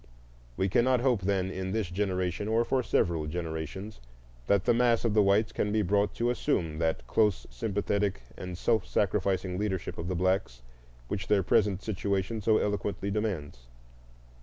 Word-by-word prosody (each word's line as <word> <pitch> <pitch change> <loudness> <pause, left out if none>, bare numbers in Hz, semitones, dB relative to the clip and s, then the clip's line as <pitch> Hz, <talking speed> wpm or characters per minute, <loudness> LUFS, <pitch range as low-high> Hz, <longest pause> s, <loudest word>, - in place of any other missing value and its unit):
We 95 - +1
cannot 120 +5 +3
hope, 125 -5 +2
then, 95 -1 0
in 95 0 -4
this 110 -6 -1
generation, 95 0 -1
or 115 +2 +2
for 130 +2 +1
several 85 -9 0
generations, 85 +5 -5 0.5
that 100 -2 +3
the - - +4
mass 120 -1 +2
of 115 - +2
the 105 - +5
whites 100 +2 +3
can 105 - -1
be 110 0 +2
brought 100 +2 +1
to 120 +1 +1
assume 80 -9 -1
that 80 -6 0
close 105 - +1
sympathetic 100 - -1
and 90 -1 -6
self 110 +1 +1
sacrificing 95 -2 0
leadership 100 -4 -3
of 85 - -4
the 95 - -1
blacks 95 -6 0 0.4
which 100 +5 -4
their 100 -2 +3
present 95 +2 +2
situation 100 +1 -2
so 110 +1 +3
eloquently 100 -1 -1
demands. 80 - -3
100 Hz, 160 wpm, -29 LUFS, 90-105 Hz, 0.5 s, the